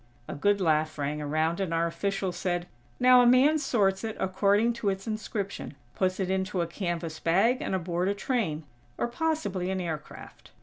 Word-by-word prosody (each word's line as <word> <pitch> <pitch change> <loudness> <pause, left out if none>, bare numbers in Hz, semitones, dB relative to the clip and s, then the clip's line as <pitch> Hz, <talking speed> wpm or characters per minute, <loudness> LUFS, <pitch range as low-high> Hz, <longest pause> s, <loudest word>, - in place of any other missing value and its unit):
A - - -5
good 205 +7 +2
laugh 155 -3 +1
rang 145 +1 -2
around, 155 +4 0
and 190 -4 -2
our 165 0 +1
official 195 +2 -2
said: 175 0 -2 0.3
"Now 250 0 +7
a 245 - +5
man 270 +6 +5
sorts 200 -8 +1
it 220 -1 -4
according 200 +5 +2
to 205 - +2
its 195 0 -3
inscription, 215 -6 -4 0.2
puts 185 0 0
it 190 -1 -1
into 190 -1 -1
a - - 0
canvas 170 -2 -4
bag 205 +10 +2
and - - -1
aboard 175 0 -1
a 200 - 0
train, 200 - -1 0.3
or - - 0
possibly 240 - -2
an 190 0 -1
aircraft. 160 -4 -7
190 Hz, 180 wpm, -28 LUFS, 170-215 Hz, 0.3 s, Now